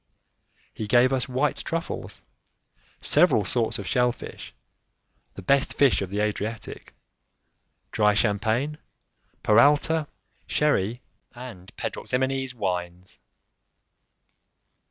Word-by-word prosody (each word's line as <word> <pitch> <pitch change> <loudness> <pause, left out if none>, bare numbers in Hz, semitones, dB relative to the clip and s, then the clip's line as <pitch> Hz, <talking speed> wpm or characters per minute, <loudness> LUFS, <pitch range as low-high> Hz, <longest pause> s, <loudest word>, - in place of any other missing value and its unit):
He 110 - -5
gave 125 +4 +4
us 130 0 -1
white 130 +4 0
truffles, 165 0 -4 0.8
several 105 - +5
sorts 115 +2 0
of 100 - -6
shell 125 +4 +2
fish, - - -10 0.8
the 95 - -9
best 140 +7 +2
fish 140 -7 +4
of 95 - -3
the 100 +2 -2
Adriatic, 105 +1 -4 1.0
dry 105 -1 +3
champagne, 110 +8 0 0.6
peralta, 145 +7 +4 0.4
sherry 120 -6 +1 0.3
and 115 -7 -10
pedroximenes 130 0 -2
wines. 90 -3 -4
120 Hz, 95 wpm, -25 LUFS, 105-130 Hz, 1.0 s, several